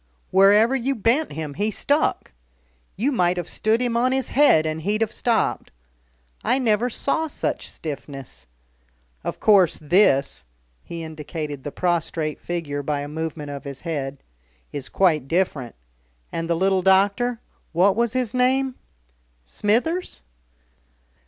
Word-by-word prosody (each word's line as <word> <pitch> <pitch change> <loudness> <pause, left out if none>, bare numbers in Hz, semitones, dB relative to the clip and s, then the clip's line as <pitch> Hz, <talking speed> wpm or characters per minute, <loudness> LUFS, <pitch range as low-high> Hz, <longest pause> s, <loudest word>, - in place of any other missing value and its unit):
wherever 205 +6 +5
you 270 +2 0
bent 240 +7 +1
him 155 -1 -5
he 205 +9 -1
stuck. 285 +8 0 0.6
You 250 +9 0
might 180 -8 +2
have 175 -2 -3
stood 220 +1 +1
him 245 -2 -1
on 250 +2 +2
his 265 -1 -1
head 260 - +5
and 155 0 -2
he'd 210 +6 -1
have 220 -1 +1
stopped. 230 -2 0 0.7
I - - +2
never 235 -2 +1
saw 320 +6 -1
such 295 - -3
stiffness. 135 - -8 0.8
Of - - -4
course 195 -5 +4
this" 155 -3 +3 0.4
he 170 -1 -7
indicated 155 -2 -6
the 145 - -5
prostrate 165 -3 -1
figure 160 -5 -3
by 145 0 -2
a 145 - -5
movement 155 -1 -5
of 140 -1 -7
his 140 -1 -8
head 140 -5 -3 0.6
"is 140 -2 -4
quite 155 -8 +2
different. 155 -7 -1 0.6
And 165 0 -3
the 170 - +2
little 190 +2 +2
doctor 200 +6 +3 0.3
what 185 +4 +3
was 235 0 +1
his 250 -4 -1
name?" 260 +1 +2 0.7
"Smithers?" 250 - -1
185 Hz, 140 wpm, -23 LUFS, 155-235 Hz, 0.8 s, wherever